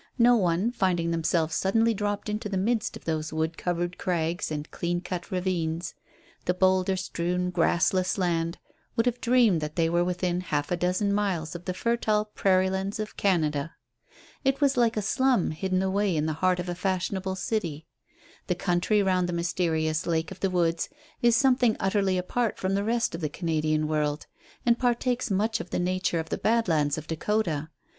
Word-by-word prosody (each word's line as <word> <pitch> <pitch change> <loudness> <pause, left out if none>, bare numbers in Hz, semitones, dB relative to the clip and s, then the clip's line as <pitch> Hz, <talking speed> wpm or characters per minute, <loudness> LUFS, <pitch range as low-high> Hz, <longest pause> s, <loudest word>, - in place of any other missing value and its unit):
No 240 0 +6
one, 185 +1 +1
finding 175 -7 0
themselves 165 -1 0
suddenly 225 +6 +2
dropped 205 0 -2
into 210 +1 -3
the 195 - -1
midst 220 +3 0
of - - -18
those 155 -1 -2
wood 160 +1 -1
covered 175 +1 -2
crags 170 -1 -1
and 150 0 -5
clean 175 0 -1
cut 180 -1 -5
ravines, 175 -2 -2 0.5
the 180 - +1
boulder 185 0 +3
strewn, 180 0 -2
grassless 180 +2 +2
land, 170 -2 0 0.4
would 230 -1 +2
have 245 0 0
dreamed 235 -9 +4
that 150 0 -4
they 165 -1 +1
were 175 0 +3
within 180 0 -1
half 150 -4 -2
a - - +3
dozen 180 +3 0
miles 185 -6 -1
of 175 0 -8
the 185 - -2
fertile 215 -1 +1
prairie 190 -3 +2
lands 195 +2 -2
of 215 0 -4
Canada. 155 -5 0 0.7
It 270 0 +1
was 280 -2 +3
like 235 -3 +2
a 210 - 0
slum 260 -4 +2
hidden 185 +3 -1
away 190 -2 +1
in 150 - +1
the 155 - 0
heart 185 -1 +3
of 180 - -3
a 175 - -2
fashionable 190 +1 -2
city. 175 -7 -3 0.6
The - - +1
country 180 +4 +1
round 185 -2 +1
the - - -2
mysterious 165 -2 0
Lake 160 -1 0
of - - -9
the 195 - +1
Woods 170 -2 0 0.3
is 235 -1 +5
something 250 -2 +3
utterly 190 -1 +1
apart 220 +5 -1
from 190 +1 -1
the 200 +1 +1
rest 230 -1 0
of 165 - -5
the 155 - -1
Canadian 155 -2 0
world, 150 -1 -1 0.4
and 235 -1 +3
partakes 245 0 0
much 215 +3 +1
of 175 - -7
the - - -2
nature 180 -1 0
of 160 - -5
the - - -2
Badlands 165 -11 +2
of 155 - -6
Dakota. 160 -3 -1
185 Hz, 185 wpm, -27 LUFS, 165-210 Hz, 0.7 s, No